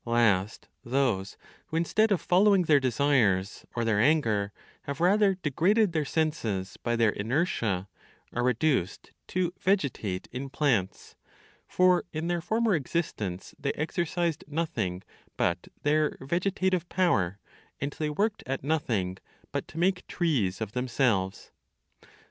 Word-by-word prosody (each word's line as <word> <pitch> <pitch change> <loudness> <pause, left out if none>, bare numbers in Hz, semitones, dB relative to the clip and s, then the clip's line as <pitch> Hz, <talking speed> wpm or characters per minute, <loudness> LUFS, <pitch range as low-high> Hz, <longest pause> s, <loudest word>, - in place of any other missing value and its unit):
Last, 110 -4 +1 0.2
those 120 -7 0 0.3
who 160 - -3
instead 215 +6 +2
of 195 - +3
following 195 +1 +4
their 155 -3 +5
desires 120 -8 +1
or 120 -1 0
their 110 -2 +2
anger, 110 -7 +2 0.3
have 140 -1 -4
rather 195 +3 +4
degraded 185 - +2
their 155 -2 0
senses 120 - -1
by 120 -1 0
their 115 -2 +3
inertia, 110 - -1 0.5
are 120 - -1
reduced 125 - 0 0.2
to 180 -1 -1
vegetate 135 - 0
in 135 +2 -5
plants; 130 -10 -1 0.5
for 180 -1 +3
in 155 +1 -3
their 175 -1 0
former 220 +5 +1
existence 130 - -3
they 140 - -1
exercised 170 0 -1
nothing 120 - -2 0.3
but 85 +1 0 0.2
their 150 +1 +2
vegetative 180 +3 0
power, 100 - +1 0.4
and 140 +1 -2
they 155 -1 0
worked 210 +8 0
at 135 0 -3
nothing 115 -12 -1 0.3
but - - -3
to - - -12
make 180 +2 +1
trees 125 - 0
of 110 -2 -3
themselves. 120 -6 0
140 Hz, 130 wpm, -28 LUFS, 110-175 Hz, 0.5 s, their